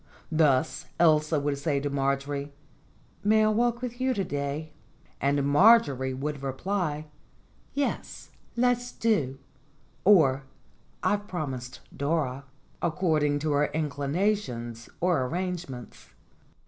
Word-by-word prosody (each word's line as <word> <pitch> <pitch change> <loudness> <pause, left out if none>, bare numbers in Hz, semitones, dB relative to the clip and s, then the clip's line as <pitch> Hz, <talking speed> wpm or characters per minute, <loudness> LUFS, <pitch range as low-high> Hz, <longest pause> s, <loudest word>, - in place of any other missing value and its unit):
Thus 155 -2 +2
Elsa 155 -2 +4
would 140 0 -1
say 140 -1 0
to 145 +1 -3
Marjorie: 140 +1 -1 0.7
"May 215 +1 +4
I - - +4
walk 240 +2 +1
with 245 0 -5
you 260 0 +1
to 195 - 0
day?" 145 0 -3 0.5
And 140 +1 +2
Marjorie 140 - +5
would 145 +1 -4
reply: 155 +3 -2 0.7
"Yes, 285 -1 -3 0.2
do 235 - -1
let's," 245 0 +1 1.1
or 155 -10 +6 0.6
"I've 205 0 +1
promised 130 -8 -5
Dora," 140 -3 -1 0.4
ac 170 - +2
cording 155 -5 +2
to 155 0 0
her 145 +1 +3
inclinations 145 - -2
or 175 -6 +2
arrangements. 170 -4 -5
150 Hz, 110 wpm, -27 LUFS, 140-190 Hz, 1.1 s, or